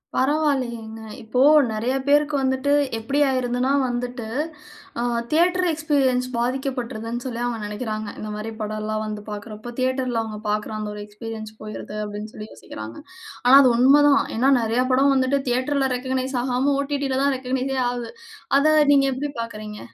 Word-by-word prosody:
பரவாயில்லையேங்க. 255 Hz, -6 st, 0 dB, 0.2 s
இப்போ 225 Hz, +3 st, -2 dB, 0.3 s
நெறைய 230 Hz, +5 st, -1 dB
பேருக்கு 290 Hz, +1 st, +3 dB
வந்துட்டு 265 Hz, +2 st, +1 dB, 0.3 s
எப்படி 275 Hz, +6 st, -1 dB
ஆயிறதுன்னா 255 Hz, 0 st, 0 dB, 0.2 s
வந்துட்டு, 245 Hz, -1 st, -4 dB, 0.7 s
அ -, -, 0 dB, 0.3 s
தியேட்டர் 360 Hz, +3 st, +3 dB
எக்ஸ்பீரியன்ஸ் 275 Hz, -5 st, +1 dB
பாதிக்கப்பட்ருதுன்னு 245 Hz, -2 st, -3 dB
சொல்லி 240 Hz, -2 st, -4 dB
அவங்க 240 Hz, -1 st, -2 dB
நெனைக்கிறாங்க. 215 Hz, 0 st, -4 dB
இந்த 215 Hz, -, -5 dB
மாரி 215 Hz, +1 st, -5 dB
படம்லாம் 215 Hz, 0 st, -3 dB
வந்து 210 Hz, -1 st, -5 dB
பார்க்றப்போ, 215 Hz, +3 st, -7 dB
தியேட்டர்ல 255 Hz, -2 st, 0 dB
அவங்க 215 Hz, -1 st, -6 dB
பார்க்ற 210 Hz, +1 st, -2 dB
அந்த 210 Hz, 0 st, -4 dB
ஒரு 210 Hz, -, -7 dB
எக்ஸ்பீரியன்ஸ் 215 Hz, +1 st, -7 dB
போய்டுது 215 Hz, 0 st, -7 dB
அப்படின்னு 210 Hz, +1 st, -6 dB
சொல்லி 215 Hz, 0 st, -8 dB
யோசிக்கிறாங்க. 110 Hz, +1 st, -9 dB, 0.5 s
ஆனா 250 Hz, +2 st, +8 dB
அது 255 Hz, -, +5 dB
உண்மதான். 280 Hz, +3 st, +6 dB, 0.2 s
ஏன்னா 265 Hz, +4 st, +4 dB
நெறைய 230 Hz, +3 st, +1 dB
படம் 275 Hz, +2 st, +4 dB
வந்துட்டு 265 Hz, +1 st, +2 dB
தியேட்டர்ல 265 Hz, +2 st, +1 dB
ரெகக்க்னைஸ் 260 Hz, +1 st, -2 dB
ஆகாம 260 Hz, +2 st, +1 dB
ஒடிடில 275 Hz, -2 st, -1 dB
தான் 280 Hz, -1 st, +2 dB
ரெகக்னைஸெ 260 Hz, +1 st, -2 dB
ஆகுது. 245 Hz, -2 st, -5 dB, 0.5 s
அத 310 Hz, +1 st, +4 dB, 0.2 s
நீங்க 275 Hz, -1 st, +4 dB
எப்படி 280 Hz, +3 st, -3 dB
பார்க்கறீங்க? 215 Hz, -2 st, -7 dB
250 Hz, 145 wpm, -23 LUFS, 220-270 Hz, 0.7 s, ஆனா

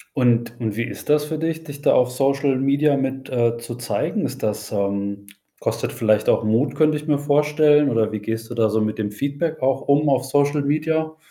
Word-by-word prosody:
Und 120 Hz, -3 st, +1 dB
und 110 Hz, -4 st, -3 dB
wie 115 Hz, -, -1 dB
ist -, -, -8 dB
das 150 Hz, 0 st, +3 dB
für 155 Hz, +1 st, -4 dB
dich, 160 Hz, 0 st, -3 dB
dich 145 Hz, -2 st, -10 dB
da -, -, +4 dB
auf 125 Hz, 0 st, +3 dB
Social 135 Hz, +1 st, +1 dB
Media 140 Hz, +2 st, +2 dB
mit, 135 Hz, 0 st, -3 dB
äh 120 Hz, -2 st, +1 dB
zu 115 Hz, 0 st, -7 dB
zeigen? 120 Hz, 0 st, -2 dB
Ist -, -, -6 dB
das, 105 Hz, -1 st, -3 dB
ähm 100 Hz, 0 st, -2 dB, 0.3 s
kostet -, -, -2 dB
vielleicht 110 Hz, -1 st, +1 dB
auch -, -, +3 dB
Mut, 110 Hz, +6 st, +1 dB
könnte 155 Hz, -1 st, +3 dB
ich 150 Hz, +1 st, -9 dB
mir 150 Hz, -2 st, +2 dB
vorstellen 150 Hz, 0 st, +3 dB
oder 115 Hz, -3 st, +1 dB
wie 110 Hz, -, -3 dB
gehst 115 Hz, +2 st, -5 dB
du -, -, -3 dB
da 115 Hz, -2 st, +2 dB
so 110 Hz, +1 st, +1 dB
mit 110 Hz, 0 st, -2 dB
dem 105 Hz, -, -1 dB
Feedback 140 Hz, +8 st, -3 dB
auch 135 Hz, 0 st, +1 dB
um 145 Hz, +2 st, +3 dB
auf 130 Hz, -1 st, +2 dB
Social 145 Hz, +2 st, +1 dB
Media? 155 Hz, +2 st, -1 dB
135 Hz, 220 wpm, -21 LUFS, 115-150 Hz, 0.3 s, da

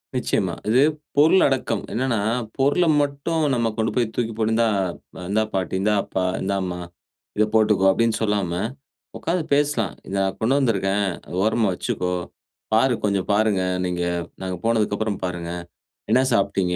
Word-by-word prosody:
நிச்சயமா. -, -, 0 dB, 0.2 s
இது 125 Hz, +4 st, +5 dB, 0.4 s
பொருள் 160 Hz, +6 st, +6 dB
அடக்கம். 130 Hz, -6 st, -1 dB
என்னன்னா, 120 Hz, -2 st, 0 dB, 0.4 s
பொருள 140 Hz, +6 st, +3 dB, 0.2 s
மட்டும் 145 Hz, +3 st, -1 dB
நம்ம 115 Hz, -2 st, +1 dB
கொண்டு 110 Hz, 0 st, 0 dB
போய் 115 Hz, -3 st, 0 dB
தூக்கி 115 Hz, -2 st, -1 dB
போட்டு 110 Hz, 0 st, +1 dB
இந்தா 115 Hz, 0 st, +3 dB, 0.6 s
இந்தா 110 Hz, +2 st, +2 dB
பாட்டி, 95 Hz, -2 st, -2 dB
இந்தா 105 Hz, +2 st, +2 dB
அப்பா, 95 Hz, -, -2 dB, 0.2 s
இந்தாம்மா 95 Hz, -2 st, -2 dB, 0.6 s
இதை 110 Hz, -, +4 dB
போட்டுக்கோ 105 Hz, -3 st, +4 dB
அப்படின்னு 115 Hz, +3 st, +2 dB
சொல்லாம 105 Hz, -5 st, 0 dB, 0.7 s
உக்காந்து 170 Hz, 0 st, -1 dB
பேசலாம். 140 Hz, -8 st, +1 dB, 0.2 s
“நான் 95 Hz, -1 st, 0 dB
கொண்டு 120 Hz, +5 st, +2 dB
வந்திருக்கேன், 100 Hz, -5 st, +1 dB, 0.3 s
ஓரமா 110 Hz, +1 st, +2 dB
வச்சிக்கோ, 90 Hz, 0 st, -2 dB, 0.6 s
பாரு 125 Hz, +4 st, +4 dB
கொஞ்சம் 100 Hz, -3 st, 0 dB
பாருங்க, 105 Hz, -2 st, +2 dB, 0.2 s
நீங்க. 90 Hz, -1 st, -2 dB, 0.4 s
நாங்க 95 Hz, -1 st, -3 dB
போனதுக்கப்புறம் 110 Hz, -2 st, 0 dB
பாருங்க. 90 Hz, -2 st, -3 dB, 0.6 s
என்ன 130 Hz, -, +5 dB
சாப்ட்டீங்க? 95 Hz, -3 st, +1 dB
110 Hz, 135 wpm, -23 LUFS, 95-120 Hz, 0.7 s, பொருள்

